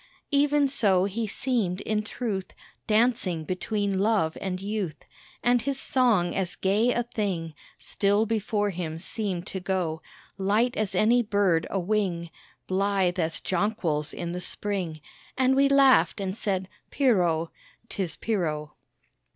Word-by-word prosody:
Even 290 0 +3
so 200 -9 +3
he 215 +3 -2
seemed 210 -5 -1
in 215 -1 0
truth 215 -3 -4 0.3
Dancing 215 -7 +2
between 200 +2 -1
Love 200 -6 +2
and 185 -2 -3
Youth; 195 -6 -4 0.4
And 245 0 +3
his 275 +2 -2
song 235 -12 +2
as 185 -2 -1
gay 210 +6 +2
a 240 - 0
thing 190 -9 -3 0.2
Still 205 +2 +1
before 210 -2 0
him 165 -3 -4
seemed 190 -1 -3
to 190 - -4
go 180 -4 -2 0.4
Light 215 +6 +2
as 215 -3 -1
any 235 +3 +4
bird 200 -7 +1
awing, 185 -3 -1 0.3
Blithe 190 -1 +1
as 165 -1 0
jonquils 170 -6 -1
in 170 0 -5
the 180 +1 -4
Spring, 180 -5 -3 0.4
And 260 0 +3
we 275 +1 +4
laughed 275 -5 +5
and 190 -1 -3
said, 195 -4 -1 0.2
"Pierrot, 175 - +2 0.4
'Tis 190 -7 -2
Pierrot." 155 -9 -2
200 Hz, 135 wpm, -26 LUFS, 180-225 Hz, 0.4 s, laughed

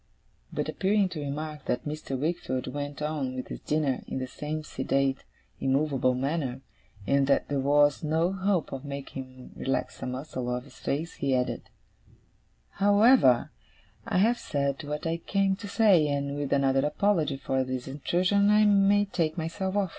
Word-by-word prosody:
But - - -2
appearing 200 0 +1
to 170 -4 -6
remark 150 +1 -5
that 125 - -2
Mr. 150 -3 -4
Wickfield 130 -4 -2
went 145 0 -4
on 145 -4 -2
with 130 - -5
his - - -6
dinner 150 -4 0
in - - -4
the 130 - -2
same 150 +4 -5
sedate, 135 -1 -1 0.4
immovable 135 -2 +1
manner, 135 -1 -2 0.4
and 140 -1 +2
that 140 - +2
there 140 -1 0
was 145 +2 +3
no 160 +3 +1
hope 190 -3 0
of 135 0 -5
making 140 -2 -6
him 130 0 -14
relax 135 0 -2
a - - -3
muscle 130 -1 -4
of 125 0 -2
his 135 -1 -16
face, 160 +5 -3
he 135 -2 +1
added: 125 0 -2 1.0
'However, 205 - +4 0.6
I - - 0
have 230 +6 +3
said 140 +1 -2
what 150 +2 -4
I 165 0 0
came 195 +2 +1
to 205 - -7
say, 200 -8 +4
and, 140 0 -1
with 145 -1 -3
another 135 -1 +3
apology 155 -2 +1
for 130 0 -1
this 130 0 -4
intrusion, 180 +8 +1
I 210 0 +5
may 205 0 +4
take 165 -5 -1
myself 180 +4 -3
off. 200 -3 +1
145 Hz, 170 wpm, -28 LUFS, 135-180 Hz, 1.0 s, I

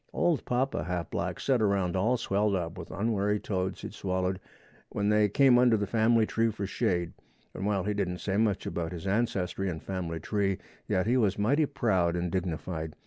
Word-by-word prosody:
Old 170 -4 +1
Papa 125 - 0
Half 90 -1 -3
Black - - -2
set 130 -4 +1
around 100 -4 +1
all 110 +7 +2
swelled 100 -1 +1
up 85 -3 -3
with - - -8
unwary 105 0 0
toads 95 -2 -3
he'd - - -7
swallowed 95 0 -1 0.5
when 100 0 -1
they 105 -1 +4
came 125 +3 +5
under 120 -3 +5
the 100 - -1
family 110 +2 +3
tree 115 +1 +1
for 100 -2 -4
shade, 85 -3 -1 0.4
and 95 - -3
while 100 -3 +1
he 105 +2 -1
didn't 95 -3 -1
say 95 +1 -2
much 105 -2 +1
about 85 0 -3
his 85 +1 -7
ancestry 95 -2 0
and 80 -3 -5
family 85 -4 -4
tree, 100 +2 0 0.3
yet 95 0 +1
he 120 +4 +2
was 105 -6 +2
mighty 140 +9 +2
proud 90 -10 +1
and 90 -1 -2
dignified. 85 -3 -3
100 Hz, 195 wpm, -29 LUFS, 90-110 Hz, 0.5 s, came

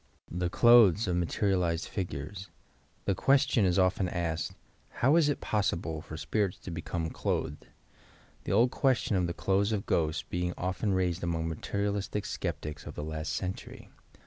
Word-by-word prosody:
' - - -36
' - - -23
THE 90 - +1
CLOTHES 115 -2 +6
OP 90 - 0
MATERIALIZED 90 -1 0
FIGUBBG 95 +1 -5 0.6
The 100 - +2
question 135 0 +3
is 90 0 +2
often 95 0 +2
asked: 85 -2 -2 0.4
"How 135 +6 +2
is 160 -3 +4
it 145 - -1
possible 85 -6 -1
for 80 - -8
spirits 95 +5 -1
to 90 - -7
become 80 0 -3
cl - - 0
otkedf 70 +2 -7 0.5
— - - -29
the - - -2
old 115 +5 +4
question 130 -7 +1
of 90 -2 +1
the 85 - -4
"clothes 100 +2 +1
of 105 -3 -1
ghosts" 80 -1 0
being 90 0 -2
often 95 +3 -1
raised 90 -1 0
among 85 -1 -1
material 100 +5 -2
istic 105 0 -3
sceptics 75 0 -4
of - - -7
the - - -4
last 80 0 -4
century. 95 +3 -5
90 Hz, 175 wpm, -30 LUFS, 85-105 Hz, 0.6 s, CLOTHES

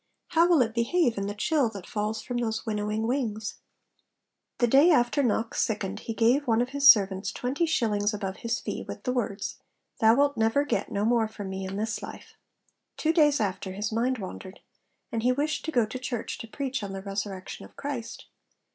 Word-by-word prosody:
How 335 0 +4
will 325 -7 +6
it 225 -1 -4
behave 240 +2 +2
in 200 - -2
the 205 - -4
chill 290 +1 +1
that 200 -4 -9
falls 215 +1 -3
from 245 - -3
those 225 -1 -2
winnowing 215 0 -1
wings? 225 -4 -2 1.0
The 245 - +3
day 275 +8 +6
after 285 -3 +3
Knox 230 -2 0
sickened 205 -2 -2
he 225 - -5
gave 250 +6 +3
one 225 -1 +3
of 245 +1 0
his 280 +1 +5
servants 195 -4 +5
twenty 280 +7 -1
shillings 215 -9 +1
above 195 -3 -4
his 230 0 -2
fee, - - -5
with - - -7
the 250 - -1
words, 205 -5 -3 0.4
'Thou 225 +1 +6
wilt 285 +1 +2
never 225 +6 +2
get - - -1
no 205 +1 0
more 230 -1 +3
from 205 -3 -7
me 190 0 -4
in 190 - -5
this 220 +1 -2
life.' - - -9 0.6
Two 320 +1 +1
days 295 -3 +4
after, 190 -2 -2
his 205 +2 -3
mind 245 +4 0
wandered; 190 -1 -8 0.5
and 230 - -1
he 250 +2 +3
wished 295 +4 -1
to 320 - -2
go 240 -6 +3
to 235 +4 -6
church 245 -3 -4
'to 230 - -7
preach 270 +2 -3
on 200 -1 -5
the 195 0 -6
resurrection 195 -1 -5
of - - -17
Christ.' 270 -5 -5
225 Hz, 200 wpm, -27 LUFS, 210-260 Hz, 1.0 s, will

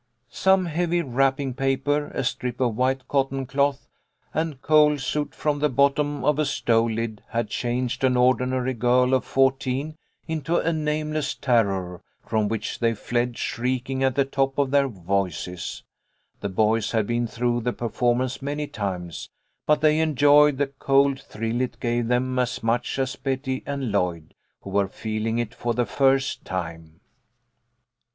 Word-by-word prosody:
Some 190 -1 +3
heavy 175 +1 0
wrapping 135 0 0
paper, 140 +2 0
a - - -3
strip 125 -1 -3
of 120 -4 +1
white 130 +2 0
cotton 135 -1 0
cloth, 140 0 0 0.5
and 155 -3 -2
coal 150 0 +4
soot 145 +2 -3
from 150 -1 -1
the 150 +1 +2
bottom 140 +2 +1
of 150 0 +2
a 155 - +2
stove 115 0 +2
lid 110 -1 -3
had 115 -1 -2
changed 125 +2 -2
an 130 -1 +3
ordinary 130 +1 +2
girl 125 +2 +2
of 130 - +3
fourteen 135 +2 0 0.3
into 160 +1 -1
a 165 - +1
nameless 155 0 -1
terror, 95 -8 0 0.2
from 110 -1 0
which 105 0 -3
they 115 -1 +1
fled, 120 +2 -2
shriek 125 +2 -2
ing 135 0 -1
at 130 -1 +2
the 140 -1 +3
top 135 0 -1
of 140 -2 +1
their 140 -1 +4
voices. 90 - -3 0.6
The 100 - -3
boys 110 +3 +1
had 110 -2 +2
been 120 +2 0
through 120 +1 -1
the 125 +2 0
performance 120 +2 -1
many 145 +2 -3
times, 90 - -5 0.4
but 150 -1 +3
they 155 0 +4
en 160 -2 +1
joyed 145 +1 +6
the 145 - +2
cold 135 0 +2
thrill 115 +3 -3
it 130 - -3
gave 120 -1 0
them 125 +1 0
as 125 -2 -1
much 115 +3 0
as 135 0 -1
Betty 130 -1 -2
and 140 -5 -2
Lloyd, 90 -5 -1 0.3
who 100 - -9
were 100 0 +2
feeling 110 +3 -3
it 120 -2 -2
for 120 -1 -2
the 120 0 +1
first 135 0 +1
time. 80 -3 -6
130 Hz, 160 wpm, -24 LUFS, 115-140 Hz, 0.6 s, joyed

